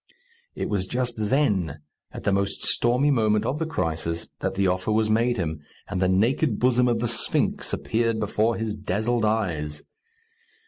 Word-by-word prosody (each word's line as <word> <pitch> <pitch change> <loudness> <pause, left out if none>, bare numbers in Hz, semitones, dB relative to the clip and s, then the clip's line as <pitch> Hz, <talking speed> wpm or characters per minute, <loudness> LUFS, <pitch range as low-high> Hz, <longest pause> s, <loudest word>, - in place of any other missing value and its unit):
It - - -2
was 95 -3 -1
just 125 +1 -1
then, 105 - +1 0.3
at - - -8
the 100 - +2
most 100 0 -1
stormy 125 +5 +2
moment 110 -5 +2
of 145 - -1
the 160 - -1
crisis, 85 - -2
that - - -2
the 100 0 +1
offer 95 +2 0
was 110 0 +2
made 120 +2 +2
him, 80 -4 -2 0.3
and 95 -2 -3
the 90 - +3
naked 110 +6 +2
bosom 125 0 +3
of 120 -1 +2
the 120 +1 -1
Sphinx 115 -1 0
appeared 115 0 0
before 110 +2 +1
his 110 -1 -2
dazzled 110 +3 0
eyes. 85 -9 -1
110 Hz, 170 wpm, -25 LUFS, 95-120 Hz, 0.3 s, the